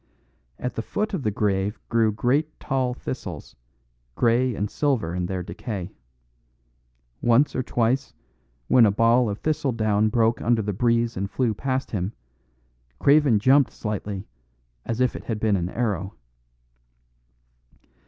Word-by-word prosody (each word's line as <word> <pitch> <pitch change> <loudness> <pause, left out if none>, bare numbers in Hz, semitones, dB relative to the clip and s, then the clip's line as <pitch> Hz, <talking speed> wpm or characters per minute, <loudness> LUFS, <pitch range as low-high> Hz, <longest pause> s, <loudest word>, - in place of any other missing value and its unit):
At 125 - -4
the - - -3
foot 210 - -3
of 185 - -1
the 110 - 0
grave 100 0 -1
grew 115 -2 +2
great 140 +9 0
tall 130 -3 -1
thistles, 90 - -7 0.6
grey 120 +1 +2
and 105 - -1
silver 115 - 0
in 90 0 -2
their 90 -1 -3
decay. 100 -1 -6 1.3
Once 120 +5 +3
or 130 - +1
twice, 125 +2 0 0.6
when 120 -3 +6
a - - +3
ball 115 +3 +3
of 100 - -3
thistledown 110 -8 +1
broke 115 +1 +2
under 115 -2 +2
the 105 0 -2
breeze 115 +2 +1
and 100 +1 -3
flew 120 -1 0
past 130 +4 -2
him, 100 0 -2 0.8
Craven 140 -5 +4
jumped 130 +6 +4
slightly 105 -2 -4 0.6
as 115 +2 -1
if 125 - +2
it - - -8
had 110 -3 -3
been 110 -2 +2
an 90 -2 -1
arrow. 100 -4 -2
115 Hz, 140 wpm, -24 LUFS, 105-125 Hz, 1.3 s, when